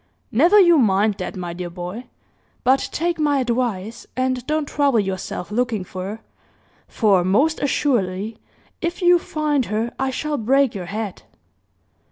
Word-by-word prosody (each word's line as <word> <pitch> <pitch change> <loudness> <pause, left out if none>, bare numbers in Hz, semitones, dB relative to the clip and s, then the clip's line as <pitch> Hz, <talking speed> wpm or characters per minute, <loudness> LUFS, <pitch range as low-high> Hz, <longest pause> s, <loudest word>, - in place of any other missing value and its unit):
"Never 340 - +5
you 345 -5 +6
mind 210 -2 +3
that, 185 - -4
my 175 -2 -5
dear 175 0 -5
boy; 180 +7 -7 0.6
but 260 +2 +2
take 340 +1 -1
my 295 -2 +2
advice, 235 -4 -2
and 255 -1 0
don't 305 0 0
trouble 280 -4 +2
yourself 190 -1 -4
looking 225 -3 0
for 185 0 -7
her; 210 +3 -6 0.7
for, 200 -6 +2
most 270 - +2
assuredly, 220 -7 0 0.4
if 345 +2 -3
you 350 0 +6
find 300 -5 -1
her, 220 +3 -2
I 270 0 0
shall 295 +3 -2
break 270 +3 +2
your 185 -3 -6
head!" 210 0 -5
235 Hz, 150 wpm, -21 LUFS, 195-285 Hz, 0.7 s, you